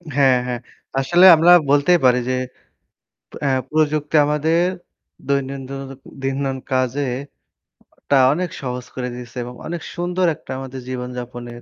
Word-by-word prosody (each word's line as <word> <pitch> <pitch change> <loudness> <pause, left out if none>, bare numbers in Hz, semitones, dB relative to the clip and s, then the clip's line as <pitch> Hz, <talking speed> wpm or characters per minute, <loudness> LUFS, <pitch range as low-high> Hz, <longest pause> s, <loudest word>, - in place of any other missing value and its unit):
হ্যাঁ, 135 -3 +5
হ্যাঁ। 125 -1 -3 0.4
আসলে 175 +7 +5
আমরা 165 +3 +5 0.2
বলতেই 145 +5 +4
পারি 125 0 +5
যে 130 - +1 1.1
এ্যা 140 - +2 0.2
প্রযুক্তি 155 0 0
আমাদের 155 +3 +1 0.7
দৈনন্দিন 135 0 -4
কাজে 130 +2 0 0.9
একটা 140 - +1 0.2
অনেক 180 +3 -2
সহজ 125 -2 -5
করে 125 -1 -3
দিয়েছে 125 0 -10
এবং 125 +1 -8
অনেক 170 0 -4
সুন্দর 180 +1 -1
একটা - - -12
আমাদের 130 0 -7
জীবনযাপনের 125 -1 -6
135 Hz, 120 wpm, -20 LUFS, 125-150 Hz, 1.1 s, হ্যাঁ